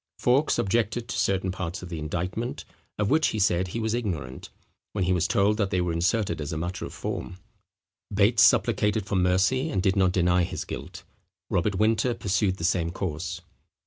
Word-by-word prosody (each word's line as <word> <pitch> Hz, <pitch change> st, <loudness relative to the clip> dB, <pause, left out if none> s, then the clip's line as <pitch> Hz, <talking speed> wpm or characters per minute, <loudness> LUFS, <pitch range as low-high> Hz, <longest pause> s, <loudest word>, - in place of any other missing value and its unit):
Fawkes 135 Hz, +5 st, +2 dB
objected 115 Hz, +3 st, 0 dB
to -, -, -2 dB
certain 95 Hz, -1 st, +1 dB
parts 90 Hz, 0 st, -5 dB
of 90 Hz, -, -8 dB
the 85 Hz, -2 st, -5 dB
indictment, 90 Hz, -, -4 dB, 0.3 s
of 105 Hz, -1 st, 0 dB
which 155 Hz, +1 st, +4 dB
he 110 Hz, -, -2 dB
said 95 Hz, -2 st, +2 dB
he 105 Hz, +6 st, -4 dB
was 110 Hz, -1 st, -1 dB
ignorant; 85 Hz, -, -4 dB, 0.4 s
when 100 Hz, -, 0 dB
he 90 Hz, +1 st, +2 dB
was 90 Hz, -1 st, +1 dB
told 105 Hz, -1 st, +2 dB
that 100 Hz, -3 st, 0 dB
they 95 Hz, -, 0 dB
were 90 Hz, -1 st, 0 dB
inserted 95 Hz, +2 st, 0 dB
as 75 Hz, -, -4 dB
a 80 Hz, -, -3 dB
matter 85 Hz, +3 st, -4 dB
of -, -, -8 dB
form. 90 Hz, -, -5 dB, 0.7 s
Bates 105 Hz, +2 st, +3 dB
supplicated 105 Hz, 0 st, +3 dB
for 100 Hz, -, -2 dB
mercy, 95 Hz, -, +2 dB
and 140 Hz, -, -1 dB
did 95 Hz, -2 st, +2 dB
not 95 Hz, -2 st, +3 dB
deny 90 Hz, 0 st, +2 dB
his 85 Hz, -, -3 dB
guilt. -, -, -7 dB, 0.5 s
Robert 95 Hz, +4 st, +1 dB
Winter 110 Hz, +4 st, +2 dB
pursued 95 Hz, -1 st, 0 dB
the 85 Hz, -, -7 dB
same 85 Hz, -1 st, +1 dB
course. 85 Hz, 0 st, -4 dB
95 Hz, 190 wpm, -26 LUFS, 90-105 Hz, 0.7 s, which